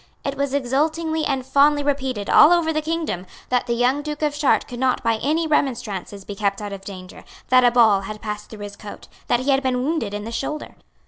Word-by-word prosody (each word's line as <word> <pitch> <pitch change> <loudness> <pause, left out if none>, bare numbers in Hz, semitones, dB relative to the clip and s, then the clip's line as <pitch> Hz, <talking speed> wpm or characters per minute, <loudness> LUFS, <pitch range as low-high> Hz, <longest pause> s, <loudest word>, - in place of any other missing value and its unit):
It 275 - -1
was 280 -1 -1
exultingly 310 +4 0
and 265 -2 -1
fondly 290 +2 +3
repeated 265 -7 -2
all 305 - +7
over 335 -2 +3
the 310 - 0
kingdom 310 - -3 0.2
that 250 0 +1
the 235 - 0
young 250 +4 +2
Duke 300 0 -5
of 295 -1 0
Chartres 295 -2 +2
could 245 - -8
not 260 -1 +1
by 230 -1 +2
any 315 +4 +1
remonstrances 225 - -2
be 205 - -6
kept 200 -1 -1
out 205 -1 -5
of 195 - -7
danger, 185 -2 -10 0.3
that 255 0 +6
a 245 - +6
ball 225 -5 +4
had 215 +2 -7
passed 210 -1 -6
through 215 -2 -10
his 205 0 -8
coat 210 - -10 0.2
that 240 - +2
he 275 +2 +1
had 270 0 +3
been 255 -2 0
wounded 270 -9 -1
in 205 - -5
the 225 - -6
shoulder. 295 +5 -4
255 Hz, 225 wpm, -22 LUFS, 210-295 Hz, 0.3 s, all